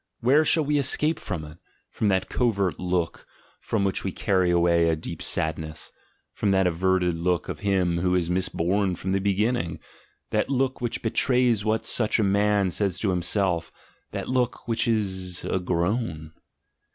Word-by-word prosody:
Where 140 +6 +4
shall 155 0 +2
we 145 0 +1
escape 150 +4 +1
from 85 -6 -5
it, 75 +2 -13 0.3
from 110 - -1
that 95 -2 +1
covert 100 -7 0
look 90 -2 -2 0.3
(from 105 -3 -1
which 95 -1 -1
we 95 - -2
carry 95 -1 +1
away 85 -1 +3
a 80 - +2
deep 80 - -7
sadness), 80 0 -2 0.4
from 105 - -1
that 95 -1 +3
averted 90 +1 +1
look 90 0 0
of - - -5
him 95 -4 +1
who 90 +1 +1
is 90 -2 +1
misborn 95 +1 0
from 95 - -3
the 95 - +2
beginning, 100 -2 0 0.5
that 105 +3 0
look 130 -1 0
which 120 -2 -3
betrays 120 -1 +2
what 110 0 0
such 110 -3 +2
a 110 - +2
man 100 -1 +2
says 95 0 -1
to 100 0 0
himself 90 -1 0 0.2
— - - -38
that - - -4
look 125 -2 -1
which 115 0 0
is 95 -5 -2
a 95 - 0
groan? 85 -2 -2
95 Hz, 170 wpm, -25 LUFS, 90-110 Hz, 0.5 s, Where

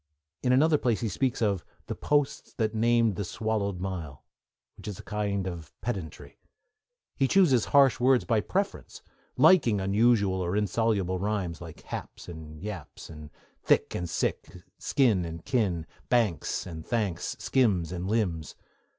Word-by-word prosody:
In 125 - +1
another 150 +4 +4
place 120 -4 0
he 115 - 0
speaks 125 +3 -1
of 100 -5 +1 0.2
The - - -4
posts 145 -1 -1
that 110 -3 -1
named 115 -2 +2
the 100 - -1
swallowed 100 -1 -2
mile, 85 -7 -5 0.5
which - - -12
is 105 -3 -5
a - - -10
kind 100 -2 -2
of 85 -4 -7
pedantry. 95 -10 -6 0.8
He 135 - +2
chooses 140 - +4
harsh 140 -3 +4
words 130 0 +4
by 115 -3 +2
preference, 195 - -3 0.3
liking 125 - +5
unusual 100 -1 +2
or 90 +1 -1
insoluble 105 -3 0
rhymes, 95 -4 -2
like 80 -2 -10
'haps' - - -7
and 80 -2 -9
'yaps,' 95 -7 -7 0.5
'thick' - - +2
and 90 -1 -3
'sick,' - - -3 0.2
'skin' 115 -10 +2
and 85 -1 -7
'kin,' 100 -11 0 0.2
'banks' 115 - +1
and 80 -3 -7
'thanks,' 105 -7 -2
'skims' 100 - +1
and 90 0 -4
'limbs.' 95 -8 -1
105 Hz, 145 wpm, -28 LUFS, 90-120 Hz, 0.8 s, liking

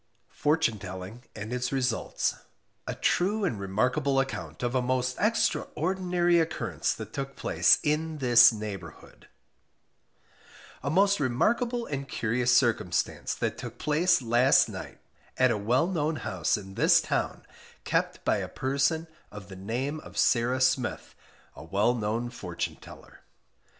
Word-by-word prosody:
FORTUNE 150 -8 +1
TELLING 95 +5 -8
AND 110 +2 -6
ITS 125 0 -2
RESULTS. 130 -4 -1 0.5
A - - -3
True 200 +3 +1
and 110 - -2
Remarkable 125 +8 0
Account 85 - -4
of 120 0 -1
a 130 - +2
most 125 0 -1
Extraordinary 180 -4 +1
Occurrence 165 -1 -1
that 110 -1 -9
took 135 0 -5
place - - +3
IN 155 +1 -1
THIS 120 -3 +7
NEIGHBOURHOOD. 105 -3 -8 1.5
A 140 - -2
most 195 +4 +3
remarkable 235 - 0
and 140 -1 -5
curious 120 +2 0
circumstance 120 -8 +1
that - - -3
took - - -7
place 155 0 +2
last 120 +3 +4
night - - -8 0.4
at 130 -1 +4
a 110 - 0
well 120 +9 +2
known 160 -4 -1
house 95 - -1
in 95 -2 -10
this - - +5
town, - - -2 0.4
kept - - -1
by - - +2
a - - -3
person 140 +5 0 0.2
of 105 -1 -11
the 95 - -9
name 125 +10 -3
of 105 - -12
Sarah 120 +5 +2
Smith, 130 -2 0 0.4
a - - -10
well 100 +8 +1
known 115 +1 -2
fortune 125 - -5
teller. - - -14
125 Hz, 140 wpm, -28 LUFS, 110-150 Hz, 1.5 s, THIS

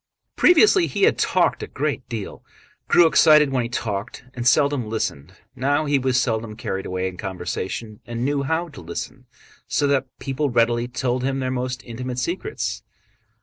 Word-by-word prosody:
Previously 360 +1 +5
he - - -2
had 440 - +4
talked - - +2
a - - -5
great - - -3
deal, - - -6 0.4
grew 175 - +6
excited 155 -3 +6
when 130 -2 +1
he 120 - -3
talked, 105 -2 -4
and 120 -1 -2
seldom 140 -4 +3
listened; 95 -6 -3 0.2
now 140 +4 +1
he 145 -1 +2
was 130 -1 +1
seldom 110 -3 -1
carried 95 -3 -4
away 95 0 -2
in 90 -1 -7
conversation 95 +3 -5
and 120 +1 -3
knew 145 0 0
how 160 +5 -1
to 150 - -11
listen 85 0 -7 0.4
so 145 - +1
that 140 -2 +1
people 140 +2 -2
readily 120 0 +2
told 125 0 -2
him 135 +1 0
their 130 -1 -2
most 125 0 -3
intimate 125 +1 -6
secrets. 175 - -3
125 Hz, 170 wpm, -22 LUFS, 115-140 Hz, 0.4 s, grew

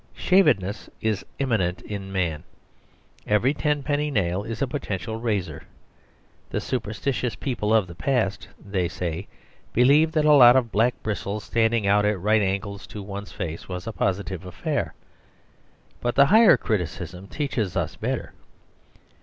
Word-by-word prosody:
Shavedness 105 - +2
is 110 -3 -1
immanent 110 -10 0
in 100 -2 -6
man. 85 -6 -1 0.8
Every 110 +7 +3
ten 150 -1 0
penny 150 +1 0
nail 95 -7 0
is 110 +1 -6
a - - +2
Potential 110 -4 -4
Razor. 105 -5 -2 0.9
The - - -2
superstitious 125 0 -2
people 115 -4 -2
of 110 -3 +4
the 85 - -10
past 105 0 -1
(they 95 -3 -2
say) 85 +1 -4 0.5
believed 150 +7 +4
that 155 -1 +3
a 150 - +6
lot 125 -3 +8
of 120 -4 +2
black 115 +4 +2
bristles 105 -1 -3
standing 115 -2 +1
out 100 +1 +4
at 105 -2 +1
right 105 +4 +3
angles 100 0 -3
to 105 - -8
one's 100 +1 -7
face 85 -3 -6
was 90 0 -5
a 115 - -5
positive 95 -2 -2
affair. 90 -1 -3 1.0
But 120 0 -2
the 140 - +7
higher 220 +5 +7
criticism 90 -2 -3
teaches 125 - -2
us - - -2
better. - - -3
105 Hz, 145 wpm, -24 LUFS, 95-125 Hz, 1.0 s, lot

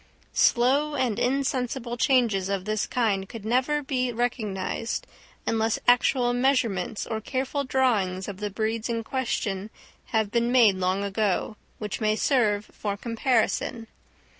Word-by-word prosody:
Slow 280 +5 +3
and 245 -5 0
insensible 255 -2 -1
changes 235 -7 +2
of 195 -2 -2
this 215 -1 -1
kind 200 -6 0
could 225 -3 -8
never 260 +6 +1
be 255 -2 -1
recognised 225 -3 -2 0.4
unless 225 0 +1
actual 245 0 +4
measurements 245 -6 0
or 220 -1 -3
careful 270 +4 -2
drawings 215 -9 +1
of 200 -2 -6
the 210 0 -2
breeds 220 +3 -2
in 230 -1 -1
question 220 -6 -2 0.4
have 220 -3 0
been 235 0 +1
made 230 -7 +5
long 185 +2 0
ago, 200 +1 -1 0.2
which 210 +1 -5
may 215 0 +2
serve 215 -5 +2
for 200 -1 -3
comparison. 230 0 0
230 Hz, 135 wpm, -26 LUFS, 205-255 Hz, 0.4 s, made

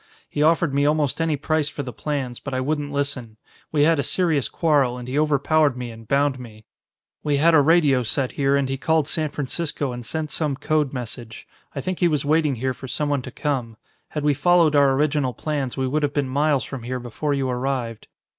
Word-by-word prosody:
He 145 - -3
offered 160 -1 +3
me 140 +1 +2
almost 150 0 +1
any 160 -2 +1
price 150 +1 0
for 145 - -5
the 125 -2 -7
plans; 135 -5 -3
but 135 -2 -5
I - - 0
wouldn't 145 +2 -2
listen. 140 -6 -3 0.3
We 145 -2 +3
had 160 0 +4
a - - +4
serious 160 -3 +1
quarrel, 145 -7 +2
and 125 0 -8
he 135 +3 0
overpowered 150 -1 +2
me 125 -1 -5
and 115 -1 -13
bound 140 0 +1
me. 110 -3 -12 0.6
"We 145 -1 +1
had 165 +4 +4
a 155 - +7
radio 145 -4 +4
set 130 +2 -1
here 140 0 +1
and 140 -1 +1
he 135 0 -2
called 160 +1 +1
San 155 -1 -1
Francisco 145 0 -3
and 120 0 -6
sent 155 +5 -4
some 150 -4 -1
code 150 0 0
message. 120 -3 -7 0.3
I - - -2
think 185 -1 -3
he 175 - +4
was 150 -4 0
waiting 155 -2 +2
here 130 +2 -1
for 130 - -9
someone 145 0 -1
to 130 - -8
come. 125 -5 -3 0.3
Had 150 - -4
we 150 -1 +3
followed 165 +1 +3
our 140 -2 +5
original 140 -3 +1
plans, 140 -3 -3
we 130 - 0
would 150 +4 0
have 145 -1 0
been 145 -2 +1
miles 140 +1 +1
from 135 -3 -7
here 125 +2 -4
before 135 +5 -2
you 135 -1 -1
arrived. 125 -3 -3
140 Hz, 220 wpm, -23 LUFS, 130-150 Hz, 0.6 s, a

